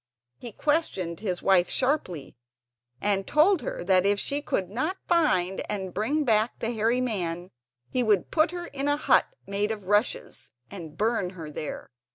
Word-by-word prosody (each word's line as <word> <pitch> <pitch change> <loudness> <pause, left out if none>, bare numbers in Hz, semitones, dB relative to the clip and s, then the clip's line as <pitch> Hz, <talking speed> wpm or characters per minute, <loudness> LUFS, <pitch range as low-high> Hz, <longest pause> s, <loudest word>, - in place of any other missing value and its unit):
He 240 - -7
questioned 200 - -1
his 185 -4 -3
wife 185 -2 +4
sharply, 220 - -1 0.6
and 195 -1 0
told 325 +4 +4
her - - -4
that 185 0 +4
if 200 +1 +2
she 285 +7 -1
could 190 -9 -1
not 305 - -2
find 195 - +2
and 190 -3 -3
bring 275 +10 0
back 220 -2 +2
the 230 - -2
hairy 230 +3 +1
man 180 -7 -2 0.4
he 255 - 0
would 210 -6 +1
put 310 0 +3
her 350 0 -5
in 280 -3 -4
a 290 0 +2
hut - - +3 0.2
made 200 +1 -1
of 210 -4 -5
rushes 205 - 0 0.2
and 165 -5 -9
burn 220 -4 0
her 160 -2 -7
there. 150 -1 -6
210 Hz, 170 wpm, -26 LUFS, 185-275 Hz, 0.6 s, wife